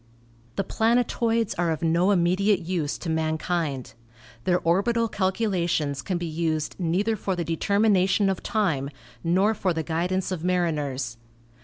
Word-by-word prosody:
The 195 - 0
planet 230 +5 +2
oids 230 -2 +1
are 175 -1 +2
of 160 0 -2
no 170 +3 +3
immediate 190 +1 +3
use 165 -4 -2
to - - -7
mankind. 160 -5 -1 0.5
Their 180 -1 +3
orbital 230 +7 +2
calculations 185 -8 0
can 185 -3 -2
be 175 - -3
used 160 -1 -2
neither 190 +6 +1
for 195 -2 -2
the 170 -1 -2
determination 195 +3 +2
of 190 -2 -1
time 160 -11 0 0.3
nor 190 +6 +3
for 185 -5 -1
the 160 - -1
guidance 180 +4 -1
of 175 -3 -3
mariners. 150 -9 -1
175 Hz, 145 wpm, -25 LUFS, 160-195 Hz, 0.5 s, no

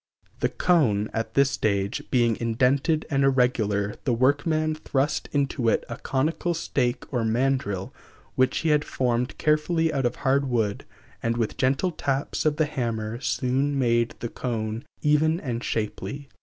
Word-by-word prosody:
The - - +1
cone, 115 - +2
at 115 0 -3
this 140 0 +4
stage, 100 -2 0
being 120 -3 +3
indented 135 +7 +1
and 135 -1 +2
irregular, 110 -6 +2
the 125 - +1
workman 155 +5 +2
thrust 145 -1 -1
into 140 -4 +1
it - - +1
a 115 - -5
conical 160 +5 -1
stake 125 -6 -1
or 120 - +1
mandrel, 110 -5 0 0.4
which 130 0 +2
he 160 - +1
had 150 -1 +3
formed 125 -2 -1
carefully 160 +1 +1
out 135 -3 +1
of - - -4
hard 140 0 +1
wood, 110 -5 -1 0.4
and 115 0 0
with 115 -2 -1
gentle 135 +8 +1
taps 140 0 -1
of 150 - +2
the 155 0 +2
hammer 115 -5 -3
soon 135 +2 0
made 120 -2 +1
the 120 - -3
cone 115 0 -3 0.2
even 155 +2 +3
and 120 -6 -4
shapely. 135 +6 -3
130 Hz, 155 wpm, -25 LUFS, 115-145 Hz, 0.4 s, this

